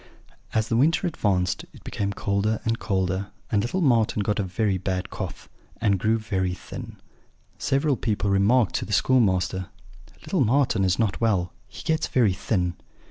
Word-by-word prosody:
"As 110 0 +2
the 115 - +1
winter 160 +8 +3
advanced 100 - 0
it - - -15
became 100 0 -2
colder 100 +2 0
and 115 0 0
colder, 95 -1 -1 0.2
and 105 -2 +3
little 155 - -1
Marten 115 -7 +3
got 105 +1 0
a - - +1
very 95 +1 0
bad 95 0 -3
cough, - - -6 0.3
and 100 -4 +2
grew 110 +4 +2
very 95 -5 -1
thin. - - -9 0.6
Several 140 +1 +1
people 105 -4 -1
remarked 100 +3 +3
to - - -3
the 105 - -4
schoolmaster, 95 -6 +2 0.6
'Little 180 -8 +2
Marten 120 -3 +2
is 95 0 +2
not 110 -2 0
well; 95 -6 +1
he - - -10
gets 160 0 0
very 115 -7 +3
thin.' 90 -2 -1
105 Hz, 165 wpm, -25 LUFS, 95-120 Hz, 0.6 s, winter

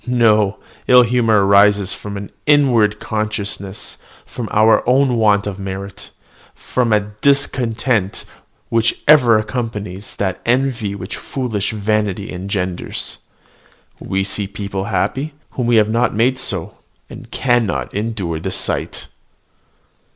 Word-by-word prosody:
No: 110 -4 +3 0.3
ill 125 0 +7
humour 115 -4 +2
arises 100 0 +4
from 100 -1 -7
an 100 0 -8 0.2
inward 120 -8 +4
consciousness 105 -2 -3 0.4
of 120 -3 -4
our 110 +1 +4
own 130 0 +3
want 105 -3 +3
of 100 -1 -5
merit, 95 0 -7 0.5
from 125 -3 -1
a 105 -1 +1
discontent 125 -6 0 0.4
which 115 0 +1
ever 125 -7 +6
accompanies 105 -4 -4
that 95 -2 -2
envy 120 -5 0
which 95 +1 -6
foolish 115 -7 -3
vanity 105 -1 -1
engenders. 90 -1 -3 0.8
We 95 0 -2
see 100 +1 -1
people 100 -1 -5
happy, 145 +7 -2 0.2
whom 125 -2 -2
we 120 - +3
have 110 -1 +4
not 115 +1 +1
made 125 +4 +2
so, 95 -4 -4 0.3
and - - -11
cannot 120 -5 0
endure 100 -6 -3
the - - -4
sight." - - -2
105 Hz, 120 wpm, -18 LUFS, 100-120 Hz, 0.8 s, ill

